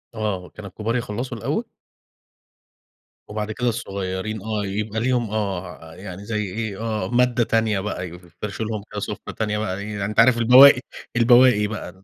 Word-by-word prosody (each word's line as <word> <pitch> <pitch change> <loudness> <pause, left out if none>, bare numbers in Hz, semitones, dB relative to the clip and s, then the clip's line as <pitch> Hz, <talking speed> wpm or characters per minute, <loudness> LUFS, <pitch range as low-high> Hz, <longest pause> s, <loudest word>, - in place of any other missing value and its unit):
آه، 100 -5 -3
كان 105 - -11
الكبار 110 +5 -3
يخلّصوا 120 +1 -3
الأول 150 - -2 1.6
وبعد 105 0 -4
كده 125 +2 0
الصغيرين، 100 -2 -4
آه، 105 -1 -2
يبقى 105 +2 -3
ليهم 120 -2 0
آه، 90 -6 -4
يعني 95 +1 -9
زي 105 -1 -2
إيه، 105 +1 -4
آه، 110 -2 -2
مادّة 125 0 +3
تانية 110 -3 +1
بقى. 95 -2 -4
يفر 90 +1 -13
يفرشوا 100 +6 -5
لهم 110 -2 -4
كده 105 - -4
سفرة - - -5
تانية 105 -1 -1
بقى 100 -3 -2
إيه، 105 +1 -6
يعني 100 -1 -3
أنت 105 +1 -1
عارف 120 +1 +6
البواقِي 125 +3 +8 0.3
البواقِي 120 -3 +5
بقى 95 -3 -8
105 Hz, 165 wpm, -22 LUFS, 100-115 Hz, 1.6 s, البواقِي